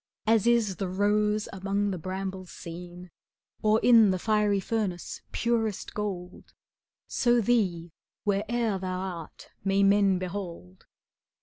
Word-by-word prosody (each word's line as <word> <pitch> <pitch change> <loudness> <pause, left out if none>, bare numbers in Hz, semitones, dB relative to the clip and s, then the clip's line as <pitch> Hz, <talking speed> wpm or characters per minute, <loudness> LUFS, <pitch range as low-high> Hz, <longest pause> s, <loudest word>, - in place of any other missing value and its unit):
As 225 0 +3
is 230 -5 +3
the 195 - -2
rose 210 +2 +1
among 200 +1 -1
the 185 - -4
brambles 185 +1 -5
seen, 175 +1 -9 0.5
Or 215 0 +4
in 230 -4 +7
the 185 - +1
fiery 210 0 +2
furnace 195 -3 -3
purest 225 -3 -1
gold, 185 -4 -5
^° - - -27 0.5
So 240 -1 +2
thee, 190 -8 +1 0.3
where'er 210 +1 0
thou 185 -1 -3
art, 180 -4 -7
may 195 0 +2
men 200 -1 +4
behold. 175 - -7
195 Hz, 125 wpm, -28 LUFS, 185-215 Hz, 0.5 s, in